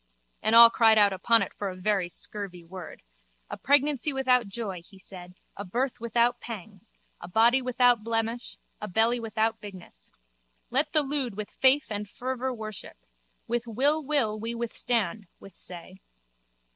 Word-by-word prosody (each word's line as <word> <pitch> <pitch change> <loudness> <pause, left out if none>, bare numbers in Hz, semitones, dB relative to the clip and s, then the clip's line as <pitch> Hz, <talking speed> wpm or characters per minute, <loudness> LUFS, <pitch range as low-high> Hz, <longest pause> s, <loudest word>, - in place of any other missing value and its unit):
And 220 - +2
all 230 0 +10
cried 225 -2 +4
out 205 -2 +5
upon 225 +5 +2
it - - -8
for 200 - -4
a 185 - -7
very 185 -1 -1
scurvy 185 -1 -4
word. 175 0 -10 0.5
A - - -3
pregnancy 285 +1 +1
without 255 -4 +2
joy, 195 -3 -6
he 195 +2 -18
said, 180 -1 -12 0.2
a 200 - -6
birth 245 +6 -3
without 235 +1 +1
pangs, 215 -1 -9 0.3
a 175 - -9
body 230 +7 +3
without 245 -2 +2
blemish, 230 +1 -3 0.2
a 210 - -4
belly 225 +5 +2
without 220 0 -2
bigness. 185 - -10 0.6
Let 290 +4 +1
the 305 -2 +4
lewd 270 -7 -3
with 210 -1 -5
faith 265 -2 +2
and 205 -1 -4
fervour 260 +2 -4
worship. 215 - -8 0.5
With 240 0 -2
will 285 +7 +2
will 260 -7 0
we 230 +2 -4
withstand, 225 -4 -2
withsay. 185 -1 -6
225 Hz, 155 wpm, -27 LUFS, 200-245 Hz, 0.6 s, all